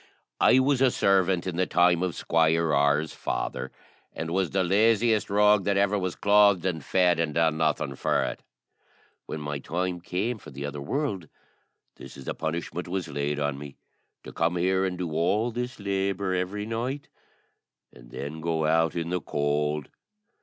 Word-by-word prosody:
I - - +5
was 130 0 +2
a 135 - +6
servant 95 -5 +2
in 90 -3 -3
the 95 - +1
time 90 -1 +3
of 90 -2 -1
Squire 80 -1 +2
R.'s 70 +2 +2
father, - - -3 0.4
and 80 0 -5
was 95 -1 0
the 95 -1 +1
laziest 110 +3 +3
rogue 105 0 +4
that 100 -1 +1
ever 100 +1 +2
was 90 -2 -3
clothed 100 -3 +4
and 80 -5 -2
fed, 90 -1 +2
and 80 -3 -1
done 80 -1 +2
nothing 75 -3 0
for - - 0
it. - - -4 0.9
When 80 - -5
my 75 -1 -4
time 90 +4 -3
came 105 +7 -2
for - - -12
the 70 +1 -6
other 70 0 -5
world, 100 - -2 0.7
this - - -11
is 70 - -10
the - - -2
punishment 85 +2 -4
was 90 -1 -3
laid 70 +1 -2
on 70 -1 -2
me 70 -1 -9 0.5
to - - -10
come 85 +2 0
here 95 +2 +1
and 90 -1 -3
do 90 -3 -4
all 100 +9 +1
this 125 +1 -5
labour 100 -1 -1
every 95 +3 -2
night, 120 +6 -3 0.9
and - - -16
then 75 +6 -6
go 80 -1 0
out 80 0 +2
in 85 0 -3
the 90 -1 -1
cold. 75 0 -1
90 Hz, 175 wpm, -26 LUFS, 80-100 Hz, 0.9 s, a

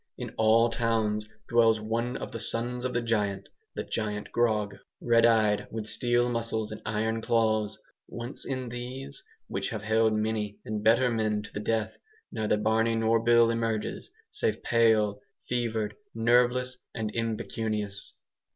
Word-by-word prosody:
In - - -6
all 115 +1 +4
towns 110 -2 0 0.2
dwells 115 -2 +4
one 115 +3 -2
of - - -6
the 115 - -5
'sons 120 +3 -1
of 125 - -1
the 120 - +1
Giant' 100 -4 -1 0.3
the - - -2
Giant 105 -2 -3
Grog 110 -4 +1 0.2
red 115 -1 +4
eyed, 110 -3 +3
with 110 -1 -5
steel 120 +2 +1
muscles 115 -2 -2
and 110 - -7
iron 110 +1 -1
claws; 110 -2 +1 0.3
once 120 +4 -7
in 130 -2 -4
these, 130 +3 -6 0.2
which 95 0 -3
have 110 -3 -5
held 110 +1 +3
many 110 -1 -1
and 105 -1 -3
better 120 +3 +4
men 110 -2 0
to - - -12
the - - -3
death, 110 0 -1 0.3
neither 105 -1 0
Barney 110 +2 +2
nor 115 0 +3
Bill 120 0 +5
emerges, 115 -2 -2 0.2
save - - -1
pale, 110 -3 +3 0.3
fevered, 115 -3 -1 0.2
nerveless, 125 +2 +2 0.2
and 110 -2 -2
impecunious. 110 -3 -3
115 Hz, 150 wpm, -28 LUFS, 110-120 Hz, 0.3 s, Bill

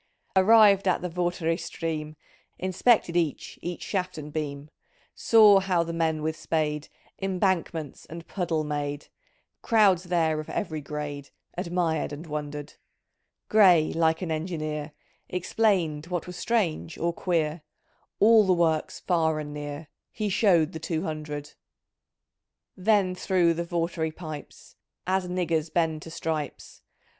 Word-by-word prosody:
"Arrived 200 0 +6
at 180 - +1
the 180 - -2
Vartry 175 -1 -1
stream. 160 -2 -4 0.4
Inspected 185 0 +2
each 165 -5 -1
each 175 0 -5
shaft 185 -3 -2
and 150 -1 -8
beam; 145 -1 -4 0.4
Saw 215 -3 +6
how 185 -3 +1
the 170 0 -5
men 160 -2 0
with 160 0 -1
spade 150 -2 -2 0.3
Embankments 180 -6 -1
and 165 +1 -9
puddle 170 -5 -1
made; 145 -1 -4 0.5
Crowds 200 -6 +4
there 165 -3 +1
of 155 - -7
every 160 -8 -3
grade 145 -1 -6 0.3
Admired 170 -4 -1
and 145 +3 -7
wondered. 150 -1 -5 0.7
Gray, 180 -7 +5
like 160 +1 +1
an 165 - -3
engineer 155 -2 -3 0.2
— - - -42
Explained 170 -7 +1
what 175 -1 -3
was 180 - -8
strange 180 -8 -1
or 170 +1 -1
queer; 165 -2 -1 0.6
All 215 -1 +6
the 185 - +5
works, 165 -3 0
far 160 -3 +1
and 150 -1 -6
near, 145 +1 -6 0.2
He 215 -1 -2
showed 180 -5 +3
the 160 - -6
two 160 0 -2
hundred. 150 -1 -5 1.2
"Then 190 -1 +2
through 180 -2 +2
the 170 +1 -3
Vartry 170 -1 -1
pipes 155 -4 -9 0.3
As 185 0 0
niggers 170 -3 -1
bend 160 -2 0
to 165 - -9
stripes. 160 -3 -5
165 Hz, 135 wpm, -26 LUFS, 155-180 Hz, 1.2 s, Arrived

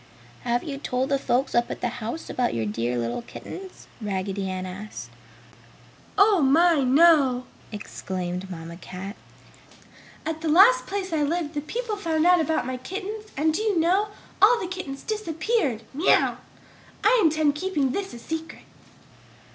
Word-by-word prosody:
"Have 240 0 0
you 280 -3 -5
told 255 -1 -1
the 275 -1 +2
folks 260 +1 0
up 240 0 +2
at - - -5
the 245 - 0
house 235 +9 -4
about 245 - -1
your 115 -1 -1
dear 115 +4 -1
little 120 - -2
kittens?" 375 +9 -10 0.2
Raggedy 195 -1 -2
Ann 185 0 -3
asked. 200 +4 -8 1.1
"Oh, 400 -3 +5
my, 320 +4 +5
no!" 270 -2 +5 0.3
exclaimed 185 -3 -5
Mamma 170 -1 -8
Cat. 185 +3 -8 1.1
"At 320 0 -3
the 325 - -1
last 405 +11 +6
place 385 -3 -3
I 310 - +1
lived 315 +1 -1
the 295 - -2
people 445 - -3
found 325 -4 0
out 355 -1 +6
about 315 -2 0
my 255 0 -3
kittens 400 - -6
and 310 +2 +2
do 370 - -1
you 420 -5 +1
know, 370 +6 +3 0.3
all 460 +4 +7
the - - -3
kittens 350 -7 -6
disappeared! 335 - -1 0.2
I 475 +6 +1
intend 310 -2 +3
keeping 295 -4 0
this 390 +6 -3
a - - -7
secret!" 320 +6 -6
300 Hz, 155 wpm, -25 LUFS, 235-360 Hz, 1.1 s, all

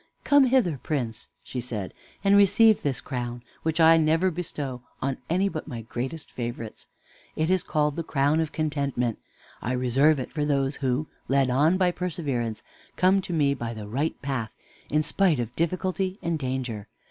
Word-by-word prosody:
"Come 285 -2 +6
hither, 240 - +2
Prince," 120 -7 -3
she 125 - -4
said, 110 -6 -5 0.3
"and 200 0 +5
receive 205 +2 +6
this 135 -5 0
crown, 120 -2 -4 0.2
which 160 0 -1
I 165 0 +7
never 165 +4 +3
bestow 145 -7 -4 0.2
on 135 -1 -2
any 185 +4 +2
but 155 -6 -5
my 120 -6 -6
greatest 130 +7 -5
favorites. 120 -2 -6 0.5
It 160 +3 +1
is 185 -1 +3
called 150 -1 0
the 165 - -2
crown 145 +1 +2
of 160 -2 -1
Contentment. 140 -7 -1 0.4
I 125 - -1
reserve 135 +4 +3
it 130 - -5
for 150 - -1
those 140 -1 0
who, 130 +2 0 0.2
led 135 -1 +2
on 150 +8 +4
by 185 -2 +3
Perseverance, 145 -11 -3 0.3
come 190 +2 +4
to 185 - -7
me 145 -4 +2
by 120 -3 -5
the 105 -1 -7
Right 140 +9 -2
Path, 130 -6 -3 0.3
in 150 +1 +2
spite 180 0 +2
of 120 0 -4
Difficulty 185 +3 -1
and 170 -2 -1
Danger. 125 -6 -3
145 Hz, 170 wpm, -26 LUFS, 125-170 Hz, 0.5 s, I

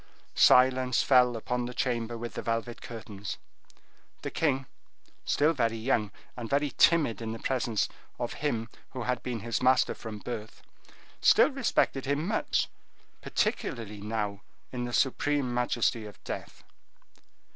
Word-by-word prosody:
Silence 130 -1 +5
fell 125 -3 +5
upon 125 +2 -2
the 125 - -7
chamber 120 -2 -1
with 120 +1 -6
the - - -4
velvet 115 0 -2
curtains. 105 -3 -7 0.9
The - - -3
king, 135 -4 +1 0.6
still 150 +3 +3
very 115 -5 0
young, 110 -2 +1 0.3
and 115 -3 -6
very 145 0 +1
timid 150 -9 +4
in 110 -1 -3
the - - -5
presence 120 -3 0 0.3
of - - -3
him 115 -7 0 0.3
who 130 -2 -4
had 125 +1 -1
been 120 -4 -4
his 115 +1 -2
master 130 +1 +4
from 110 -2 -7
his 105 - -11
birth, 110 -2 -6 0.6
still - - +6
respected 235 - +1
him 145 +3 0
much, 215 - +1 0.5
particularly 105 -3 -2
now, 105 -1 -3 0.3
in 125 -1 -3
the 120 - -4
supreme 135 0 +1
majesty 120 -2 0
of 105 - -14
death. - - -7
120 Hz, 145 wpm, -29 LUFS, 115-130 Hz, 0.9 s, still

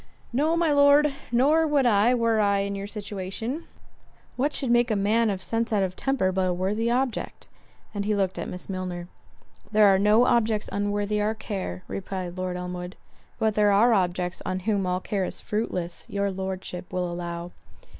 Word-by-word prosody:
"No, 310 +6 +2
my 335 -2 +2
Lord, 285 0 +5 0.2
nor 295 +7 +4
would 290 -3 +2
I, 230 +2 +4
were 230 -2 +2
I 200 -1 +3
in 200 0 -2
your 200 0 -5
situation. 210 - -5 0.7
What 280 +4 +1
should 265 -4 -1
make 240 0 +4
a 215 - +1
man 215 +3 +2
of 190 -2 -3
sense 230 0 -1
out 205 -3 +2
of 185 -1 -3
temper 265 -8 0
but 185 0 0
a - - +1
worthy 205 +6 0
object!" 250 0 -2 0.5
And 200 -1 -2
he 210 0 +1
looked 190 -2 -1
at - - -4
Miss 180 - -7
Milner. 180 -2 -5 0.6
"There 215 0 +5
are 195 -1 +5
no 210 +4 +5
objects 220 -3 +2
unworthy 205 +1 -1
our 215 +2 0
care:" 190 - -5
replied 185 -2 -5
Lord 185 -1 -3
Elmwood. 180 0 -6 0.4
"But 220 -1 +1
there 210 0 +3
are 225 +4 +5
objects 180 -2 0
on 185 0 -3
whom 200 -1 0
all 180 0 -1
care 195 -1 -2
is - - -3
fruitless, 180 -5 -3
your 200 0 -1
Lordship 190 -1 -5
will 180 -1 -1
allow." 175 0 -5
205 Hz, 185 wpm, -26 LUFS, 185-230 Hz, 0.7 s, Lord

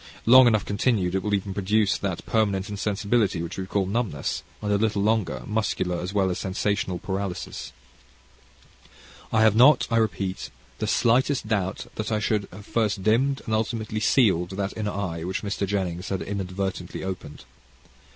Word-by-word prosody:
Long 130 +2 +8
enough 110 -4 +2
continued 100 -3 +1
it 95 - +1
will 105 +2 0
even 100 0 -3
produce 100 +1 +2
that 95 -4 -3
permanent 100 -3 0
insensibility 100 -1 0
which 85 - -6
we 95 - -4
call 100 0 0
numbness, 100 - -2 0.2
and 105 -1 -2
a - - +4
little 105 -2 +1
longer, 100 - 0
muscular 95 -5 -1
as 90 +2 -4
well 95 -2 +1
as 90 - -3
sensational 100 0 -1
paralysis. 95 0 -4 1.6
I 110 0 +4
have 110 -1 +5
not, 130 +4 +6
I 115 - +3
repeat, 100 -4 -1 0.3
the - - -1
slightest 130 +4 +2
doubt 100 -3 -1
that 110 +1 -3
I 110 - +2
should 105 -1 0
have 100 +2 -11
first 105 -4 0
dimmed 130 +6 +2
and 110 - -2
ultimately 110 0 -1
sealed 100 -7 +3
that 100 -1 -2
inner 105 -1 -2
eye 90 -5 -3
which 95 +4 -3
Mr. 100 -1 -2
Jennings 95 -2 -2
had 95 -2 -2
inadvertently 95 -2 -4
opened. 95 -6 -6
100 Hz, 165 wpm, -25 LUFS, 95-110 Hz, 1.6 s, Long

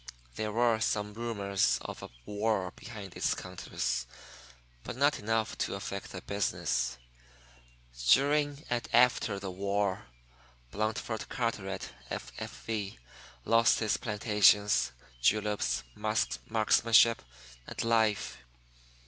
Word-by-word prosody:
There 110 -1 -2
were 115 0 +3
some 105 -1 0
rumors 100 -4 0
of - - -7
a - - -8 0.2
war 105 -3 0
behind 105 -6 -9
its - - +1
counters, 65 -8 -3 0.8
but - - -6
not 145 +2 +3
enough 110 +1 0
to - - -1
affect - - -5
the - - -7
business. 65 -10 -1 1.1
During 145 +1 +3
and 120 -1 -1
after 120 -4 +4
the 100 -1 -5
war, 100 -5 -1 0.6
Blandford 110 +1 -2
Carteret, 100 -5 -3 0.2
F.F.V., 105 - -5 0.5
lost 115 0 +5
his 110 -2 +1
plantations, 105 - +3 0.3
juleps, 105 - +1
marksmanship, 110 - +3 0.5
and - - -4
life. 110 - +1
105 Hz, 100 wpm, -31 LUFS, 100-115 Hz, 1.1 s, lost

